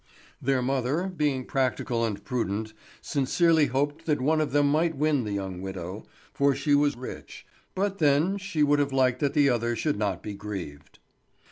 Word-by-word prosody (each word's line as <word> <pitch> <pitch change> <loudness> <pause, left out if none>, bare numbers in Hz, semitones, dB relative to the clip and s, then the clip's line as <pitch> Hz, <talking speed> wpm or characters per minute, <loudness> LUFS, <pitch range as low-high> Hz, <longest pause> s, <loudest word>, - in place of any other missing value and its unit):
Their 130 -1 +1
mother, 135 +8 -1
being 145 -5 0
practical 130 -3 -1
and 105 -3 -3
prudent, 110 -3 -2 0.3
sincerely 155 +2 +2
hoped 145 +5 -2
that 150 -3 +2
one 155 +4 +2
of 150 - -1
them 145 +1 +3
might 160 +2 +1
win 145 -4 +1
the 105 - -4
young 95 -2 -4
widow, 95 +1 -6 0.3
for 140 -1 +2
she 145 - 0
was 145 -2 +3
rich; 125 - -9 0.3
but 195 +1 -1
then 155 +6 +3
she 175 -6 -1
would 145 0 +3
have 140 -1 +1
liked 130 -2 +2
that 140 0 0
the 145 -2 +5
other 120 -1 0
should 145 0 -1
not 100 -4 -1
be 105 - -5
grieved. 90 -8 -7
135 Hz, 175 wpm, -27 LUFS, 110-150 Hz, 0.3 s, the